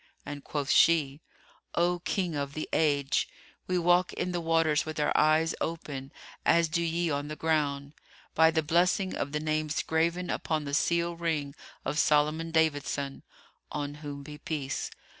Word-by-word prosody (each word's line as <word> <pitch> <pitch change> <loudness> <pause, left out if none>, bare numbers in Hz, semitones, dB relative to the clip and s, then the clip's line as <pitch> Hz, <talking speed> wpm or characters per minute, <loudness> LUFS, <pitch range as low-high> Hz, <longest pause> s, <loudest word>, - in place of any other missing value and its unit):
and 145 -1 -7
quoth 145 -2 -2
she, 150 -3 +4 0.5
"O 175 +1 +2
King 180 -1 -1
of 140 0 -3
the 155 - -3
Age, 145 -3 +2 0.4
we 185 - +1
walk 175 +1 +3
in 180 - -2
the 175 -1 -2
waters 165 -2 +2
with 155 -1 -5
our 150 - +1
eyes 155 +2 +4
open, 145 -5 -4 0.3
as 170 0 +4
do 170 +2 0
ye 170 0 0
on 145 0 -2
the 155 - -5
ground, 145 -3 0 0.4
by 160 0 +6
the 160 -1 +1
blessing 180 +4 +2
of 140 - -3
the 150 - -1
names 155 0 -1
graven 170 +3 0
upon 155 -2 -1
the 140 - -5
seal 170 +3 +1
ring 160 -4 -2 0.3
of 145 +4 -1
Solomon 155 +2 +2
David 160 -3 +2
son 140 -1 -3 0.5
(on 145 -1 -3
whom 145 -2 -6
be 150 +1 -9
peace!). 145 -4 -3
155 Hz, 165 wpm, -29 LUFS, 145-165 Hz, 0.5 s, by